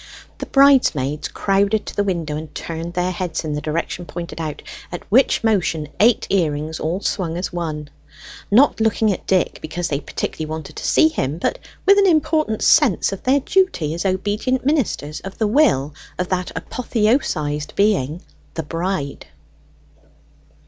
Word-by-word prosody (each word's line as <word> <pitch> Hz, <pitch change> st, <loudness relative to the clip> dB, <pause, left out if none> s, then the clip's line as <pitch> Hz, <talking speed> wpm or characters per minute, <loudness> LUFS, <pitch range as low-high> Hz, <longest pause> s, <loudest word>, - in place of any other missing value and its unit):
The -, -, -5 dB
bridesmaids 245 Hz, -, +3 dB
crowded 200 Hz, +2 st, +1 dB
to -, -, -7 dB
the 205 Hz, -, +1 dB
window 170 Hz, -6 st, -2 dB
and 155 Hz, 0 st, -7 dB
turned 165 Hz, +1 st, -5 dB
their 180 Hz, +1 st, 0 dB
heads 180 Hz, -2 st, -3 dB
in 150 Hz, -, -2 dB
the 150 Hz, -, -3 dB
direction 170 Hz, +3 st, -3 dB
pointed 170 Hz, -1 st, -6 dB
out, 155 Hz, -2 st, -5 dB, 0.3 s
at 175 Hz, -, -6 dB
which 255 Hz, +2 st, +4 dB
motion 175 Hz, -8 st, +1 dB
eight 225 Hz, +2 st, +4 dB
earrings 160 Hz, -4 st, 0 dB
all 170 Hz, +5 st, -2 dB
swung 175 Hz, -5 st, -2 dB
as 180 Hz, 0 st, -4 dB
one: 155 Hz, -4 st, -4 dB, 0.6 s
not 235 Hz, +2 st, +4 dB
looking 220 Hz, -1 st, +2 dB
at -, -, -9 dB
Dick 185 Hz, -2 st, +1 dB
because 170 Hz, +2 st, -4 dB
they 140 Hz, -, -1 dB
particularly 155 Hz, +1 st, -4 dB
wanted 155 Hz, -1 st, -6 dB
to -, -, -3 dB
see 315 Hz, -, +5 dB
him, 155 Hz, -, -2 dB
but -, -, -1 dB, 0.3 s
with 400 Hz, +1 st, +6 dB
an 395 Hz, -, +5 dB
important 310 Hz, -, +1 dB
sense 245 Hz, -, +4 dB
of 195 Hz, -, -6 dB
their 275 Hz, +2 st, +2 dB
duty 255 Hz, -, +1 dB
as 170 Hz, -, -3 dB
obedient 205 Hz, +7 st, -1 dB
ministers 260 Hz, -, 0 dB
of 195 Hz, -, -9 dB
the 220 Hz, -, +1 dB
will 205 Hz, -, +3 dB, 0.2 s
of 180 Hz, 0 st, -2 dB
that 180 Hz, -1 st, -1 dB
apotheosised 210 Hz, -, -1 dB
being 185 Hz, -6 st, +1 dB, 0.3 s
the 160 Hz, -, -2 dB
Bride. 165 Hz, -2 st, -3 dB
180 Hz, 160 wpm, -20 LUFS, 155-220 Hz, 0.6 s, with